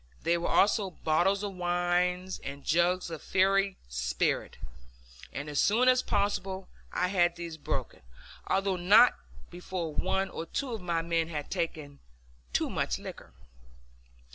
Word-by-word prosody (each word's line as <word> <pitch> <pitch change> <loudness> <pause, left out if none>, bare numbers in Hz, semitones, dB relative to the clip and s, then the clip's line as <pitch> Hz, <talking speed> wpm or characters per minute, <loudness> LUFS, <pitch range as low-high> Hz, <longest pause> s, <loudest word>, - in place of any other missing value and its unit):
There 170 +2 +2
were 170 - -2
also 205 0 +3
bottles 180 +4 +1
of 200 -1 -3
wine, 180 0 0 0.2
and 140 0 -7
jugs 175 +2 +2
of 160 -2 -6
fiery 195 +1 +2
spirit, 60 0 -1 0.7
and 145 +2 -5
as 145 -1 -1
soon 230 +6 +3
as 255 0 +5
possible 195 -2 -1 0.2
I 180 - 0
had 175 -3 +2
these 170 -1 -6
broken, 160 - -4 0.5
although 195 -1 +1
not 205 +8 +7 0.4
before 175 -2 -5
one 190 +3 0
or 165 - -6
two 275 +7 -3
of 225 -3 -4
my 170 -2 -1
men 165 -1 0
had 150 -3 -5
taken 150 -4 -3 0.5
too - - +1
much - - -1
liquor. - - -9
180 Hz, 140 wpm, -29 LUFS, 165-195 Hz, 0.7 s, not